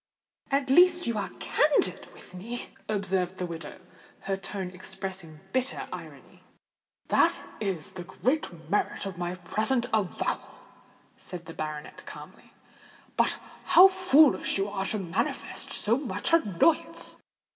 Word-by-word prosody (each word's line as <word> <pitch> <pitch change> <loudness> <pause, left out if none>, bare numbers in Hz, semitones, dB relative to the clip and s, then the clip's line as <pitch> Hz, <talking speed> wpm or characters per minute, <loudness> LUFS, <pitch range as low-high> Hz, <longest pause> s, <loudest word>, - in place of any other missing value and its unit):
"At 275 -1 +1
least 355 +3 +6
you 235 - -1
are 195 -2 -3
candid 295 0 +2
with - - -14
me," 230 +7 -6 0.2
observed 190 -3 0
the 180 - -2
widow, 165 -2 -7 0.4
her 195 - -1
tone 190 -1 -5
expressing 185 -4 -7
bitter 260 +1 -1
irony. - - -10 0.7
"That - - +4 0.2
is 190 -7 -2
the 180 - -7
great 180 - -2
merit 205 +2 0
of 190 -3 -6
my 175 0 -2
present 220 +7 0
avowal," 210 -4 -1 0.6
said 175 -2 -8
the 165 - -8
baronet 155 -1 -6
calmly. - - -11 0.6
"But - - +2 0.3
how 360 +1 +9
foolish 315 - +4
you 195 +1 0
are 195 -1 -2
to 215 - 0
manifest 180 -2 -2
so 230 +5 +1
much 285 +4 -2
annoyance. 310 - +2
195 Hz, 130 wpm, -28 LUFS, 180-260 Hz, 0.7 s, how